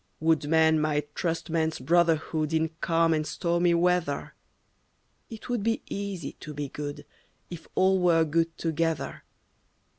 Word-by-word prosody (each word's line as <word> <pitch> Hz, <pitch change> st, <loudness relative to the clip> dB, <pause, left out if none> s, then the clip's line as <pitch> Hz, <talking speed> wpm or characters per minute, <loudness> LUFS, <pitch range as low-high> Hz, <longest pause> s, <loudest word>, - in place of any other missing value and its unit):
Would 160 Hz, -2 st, +2 dB
man 160 Hz, 0 st, +4 dB
might 150 Hz, -1 st, -1 dB
trust 165 Hz, -1 st, -2 dB
man's 160 Hz, -1 st, 0 dB
brotherhood 160 Hz, +1 st, +1 dB
In 160 Hz, 0 st, +1 dB
calm 165 Hz, -1 st, +2 dB
and 155 Hz, -1 st, 0 dB
stormy 170 Hz, +1 st, +1 dB
weather. 175 Hz, -4 st, 0 dB, 1.0 s
It 220 Hz, -1 st, -9 dB
would 245 Hz, -3 st, -1 dB
be 225 Hz, +2 st, 0 dB
easy 200 Hz, -6 st, -4 dB
to 150 Hz, -1 st, -8 dB
be 145 Hz, -1 st, -4 dB
good 145 Hz, +1 st, -6 dB, 0.5 s
If 170 Hz, -2 st, -8 dB
all 190 Hz, 0 st, +3 dB
were 170 Hz, -2 st, +4 dB
good 165 Hz, +2 st, 0 dB
together. 165 Hz, -3 st, -2 dB
165 Hz, 140 wpm, -27 LUFS, 155-175 Hz, 1.0 s, man